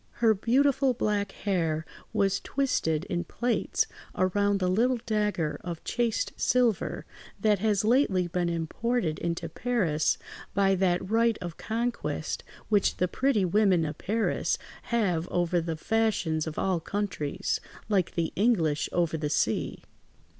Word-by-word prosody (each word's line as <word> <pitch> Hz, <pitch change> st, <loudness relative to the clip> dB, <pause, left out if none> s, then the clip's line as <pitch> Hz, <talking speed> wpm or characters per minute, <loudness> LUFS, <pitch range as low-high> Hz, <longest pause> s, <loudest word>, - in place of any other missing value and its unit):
Her 225 Hz, -2 st, +4 dB
beautiful 260 Hz, +4 st, +2 dB
black 205 Hz, -3 st, 0 dB
hair 165 Hz, -6 st, -1 dB, 0.3 s
was 195 Hz, -1 st, +1 dB
twisted 165 Hz, -, 0 dB
in 175 Hz, -2 st, -2 dB
plaits 240 Hz, -1 st, 0 dB, 0.3 s
around 200 Hz, +2 st, +2 dB
the 185 Hz, -, +1 dB
little 235 Hz, +7 st, +2 dB
dagger 210 Hz, -8 st, 0 dB
of 170 Hz, -2 st, -6 dB
chased 240 Hz, -, -1 dB
silver, 245 Hz, -5 st, +1 dB, 0.3 s
that 210 Hz, -3 st, +3 dB
has 210 Hz, 0 st, +1 dB
lately 220 Hz, -7 st, +3 dB
been 175 Hz, 0 st, -1 dB
imported 170 Hz, +2 st, -1 dB
into 170 Hz, 0 st, -2 dB
Paris 165 Hz, -6 st, 0 dB, 0.4 s
by 195 Hz, -1 st, +4 dB
that 185 Hz, -1 st, +1 dB
right 230 Hz, +1 st, +2 dB
of 175 Hz, -2 st, -6 dB
conquest 235 Hz, +2 st, -2 dB, 0.2 s
which 205 Hz, -2 st, +2 dB
the 180 Hz, -, +2 dB
pretty 230 Hz, -1 st, +1 dB
women 185 Hz, -3 st, +3 dB
of 150 Hz, 0 st, -5 dB
Paris 220 Hz, +3 st, 0 dB, 0.3 s
have 185 Hz, -8 st, 0 dB
over 175 Hz, 0 st, +1 dB
the 165 Hz, -1 st, -3 dB
fashions 180 Hz, -6 st, 0 dB
of 155 Hz, -, -5 dB
all 185 Hz, -3 st, +1 dB
countries, 185 Hz, -5 st, -2 dB, 0.3 s
like 195 Hz, -5 st, +1 dB
the 165 Hz, -1 st, -1 dB
English 175 Hz, -9 st, +2 dB
over 170 Hz, -2 st, +1 dB
the 150 Hz, -1 st, -2 dB
sea. 150 Hz, -, 0 dB
195 Hz, 135 wpm, -28 LUFS, 170-225 Hz, 0.4 s, Her